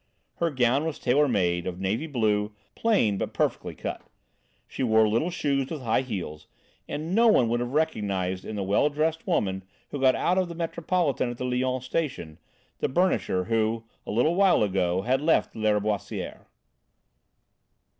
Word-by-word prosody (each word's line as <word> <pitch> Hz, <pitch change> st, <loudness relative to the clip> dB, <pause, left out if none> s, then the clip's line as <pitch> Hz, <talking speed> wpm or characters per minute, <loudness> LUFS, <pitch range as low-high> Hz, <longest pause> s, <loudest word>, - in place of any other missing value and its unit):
Her 170 Hz, -, +1 dB
gown 130 Hz, +1 st, +2 dB
was 160 Hz, -2 st, -3 dB
tailor 140 Hz, +4 st, +2 dB
made, 90 Hz, -7 st, 0 dB
of 90 Hz, 0 st, -4 dB
navy 105 Hz, +11 st, -1 dB
blue, 105 Hz, -6 st, 0 dB, 0.2 s
plain 115 Hz, -, +2 dB
but -, -, -4 dB
perfectly -, -, -1 dB
cut; -, -, -5 dB, 0.7 s
she -, -, -6 dB
wore 110 Hz, -3 st, +4 dB
little 115 Hz, +11 st, +1 dB
shoes 140 Hz, -6 st, -1 dB
with 155 Hz, -5 st, -5 dB
high 115 Hz, +1 st, +2 dB
heels, 90 Hz, -11 st, -6 dB, 0.4 s
and 155 Hz, +4 st, -4 dB
no 230 Hz, +3 st, +5 dB
one 130 Hz, -, +5 dB
would 120 Hz, +1 st, +1 dB
have 120 Hz, +1 st, -3 dB
recognised 100 Hz, -12 st, -1 dB
in 110 Hz, -, -6 dB
the 100 Hz, -, -2 dB
well 100 Hz, +9 st, +2 dB
dressed 155 Hz, +2 st, -1 dB
woman, 95 Hz, -2 st, 0 dB, 0.3 s
who 145 Hz, -, -4 dB
got 130 Hz, -1 st, +5 dB
out 185 Hz, +2 st, +1 dB
of 185 Hz, -2 st, -1 dB
the 170 Hz, -, -7 dB
Metropolitan 165 Hz, -4 st, -1 dB
at 120 Hz, -, -6 dB
the 125 Hz, -, -3 dB
Lyons 130 Hz, 0 st, -1 dB
Station, 130 Hz, -, -3 dB, 0.4 s
the -, -, 0 dB
burnisher, 155 Hz, -, +1 dB
who, 115 Hz, +1 st, 0 dB, 0.2 s
a -, -, -10 dB
little 125 Hz, +10 st, +2 dB
while 190 Hz, -, +4 dB
ago, 95 Hz, -2 st, 0 dB
had 130 Hz, +4 st, +1 dB
left 160 Hz, +2 st, +2 dB
Lâriboisière. 105 Hz, -2 st, -2 dB
125 Hz, 165 wpm, -26 LUFS, 105-155 Hz, 0.7 s, no